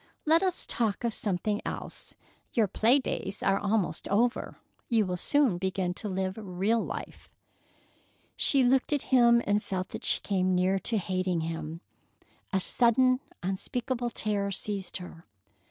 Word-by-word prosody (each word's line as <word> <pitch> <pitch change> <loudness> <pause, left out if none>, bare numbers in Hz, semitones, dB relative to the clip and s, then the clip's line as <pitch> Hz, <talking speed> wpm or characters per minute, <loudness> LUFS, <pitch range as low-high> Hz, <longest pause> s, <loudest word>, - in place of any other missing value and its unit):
Let 320 +2 +5
us 370 -2 -1
talk 225 -3 -1
of 235 -2 0
something 205 +1 -1
else. - - -6 0.4
Your 225 -3 +3
play 230 +7 +4
days 210 -6 -4
are 195 0 +3
almost 200 -6 -1
over. 235 +5 0 0.3
You 225 -4 +3
will 180 -1 -2
soon 250 -1 +2
begin 185 -1 -1
to 210 +3 -4
live 190 +2 -2
real 200 +4 0
life." - - -7 1.1
She 275 -2 +3
looked 260 +3 +3
at 290 - 0
him 235 -1 +6
and 205 +1 +2
felt 185 -1 -3
that - - -7
she - - +4
came 185 -2 +1
near 185 +2 +2
to 225 +3 0
hating 185 -3 -1
him. 160 0 -5 0.7
A 190 - +2
sudden, 255 +5 +3 0.2
unspeakable 240 +6 -2
terror 205 -3 -1
seized 195 0 -3
her. 180 -2 -11
205 Hz, 150 wpm, -29 LUFS, 185-235 Hz, 1.1 s, him